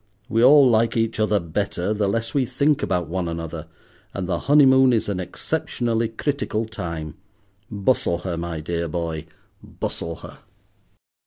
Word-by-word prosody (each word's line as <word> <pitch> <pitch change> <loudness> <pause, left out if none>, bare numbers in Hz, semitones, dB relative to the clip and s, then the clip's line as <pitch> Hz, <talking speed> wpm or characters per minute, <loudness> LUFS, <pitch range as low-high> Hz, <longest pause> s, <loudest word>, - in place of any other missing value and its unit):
We 115 -2 +2
all 140 +1 +8
like 115 -1 +2
each 115 -1 0
other 105 -1 +2
better 90 +3 -2
the 105 -1 0
less 115 +3 -2
we 140 - +2
think 140 +4 +1
about 90 -3 -1
one 90 +1 -2
another, 80 -1 -5 0.5
and 95 -2 -3
the 85 -2 -1
honeymoon 130 -3 +6
is 115 - +1
an 100 -3 -2
exceptionally 115 - -2
critical 115 -2 -2
time. 85 -8 -6 0.6
Bustle 100 -4 +1
her, 90 -2 -2
my 85 -1 -4
dear 85 +1 -2
boy, 80 -1 -4 0.3
bustle 85 0 -5
her." - - -12
105 Hz, 150 wpm, -23 LUFS, 85-115 Hz, 0.6 s, all